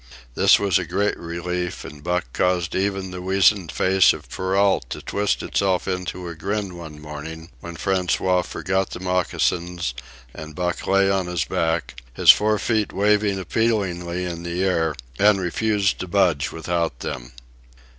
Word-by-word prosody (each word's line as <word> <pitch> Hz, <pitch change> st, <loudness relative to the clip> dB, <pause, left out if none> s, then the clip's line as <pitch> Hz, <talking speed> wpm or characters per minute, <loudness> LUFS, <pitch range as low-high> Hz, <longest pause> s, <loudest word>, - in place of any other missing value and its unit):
This -, -, +5 dB
was 100 Hz, -3 st, +2 dB
a -, -, -2 dB
great 100 Hz, +5 st, 0 dB
relief, 85 Hz, +1 st, -4 dB
and 75 Hz, 0 st, -10 dB
Buck 90 Hz, -2 st, 0 dB
caused 90 Hz, -2 st, 0 dB
even 95 Hz, -1 st, -1 dB
the 90 Hz, 0 st, -6 dB
weazened 95 Hz, -1 st, +3 dB
face 95 Hz, 0 st, +4 dB
of -, -, -10 dB
Perrault 95 Hz, +1 st, +1 dB
to -, -, -5 dB
twist 100 Hz, 0 st, -1 dB
itself 95 Hz, -2 st, 0 dB
into 90 Hz, -1 st, -3 dB
a 85 Hz, -, -5 dB
grin 100 Hz, +2 st, -3 dB
one 80 Hz, -3 st, -9 dB
morning, 80 Hz, +3 st, -8 dB
when 85 Hz, -1 st, -8 dB
François 90 Hz, 0 st, +1 dB
forgot 95 Hz, 0 st, -2 dB
the -, -, -7 dB
moccasins 90 Hz, -4 st, -1 dB, 0.4 s
and 75 Hz, -1 st, -9 dB
Buck 90 Hz, 0 st, -2 dB
lay 100 Hz, 0 st, +4 dB
on 95 Hz, -2 st, 0 dB
his 90 Hz, -3 st, -1 dB
back, 80 Hz, -7 st, -2 dB
his -, -, +9 dB
four 105 Hz, 0 st, +2 dB
feet 110 Hz, 0 st, 0 dB
waving 105 Hz, 0 st, +2 dB
appealingly 90 Hz, -4 st, -1 dB
in 85 Hz, -1 st, -5 dB
the 85 Hz, +2 st, -2 dB
air, 80 Hz, -5 st, +1 dB, 0.2 s
and 105 Hz, -1 st, +5 dB
refused 100 Hz, +2 st, 0 dB
to 90 Hz, -, -4 dB
budge 85 Hz, -6 st, +2 dB
without 85 Hz, -5 st, -2 dB
them. -, -, -6 dB
90 Hz, 155 wpm, -22 LUFS, 85-95 Hz, 0.4 s, his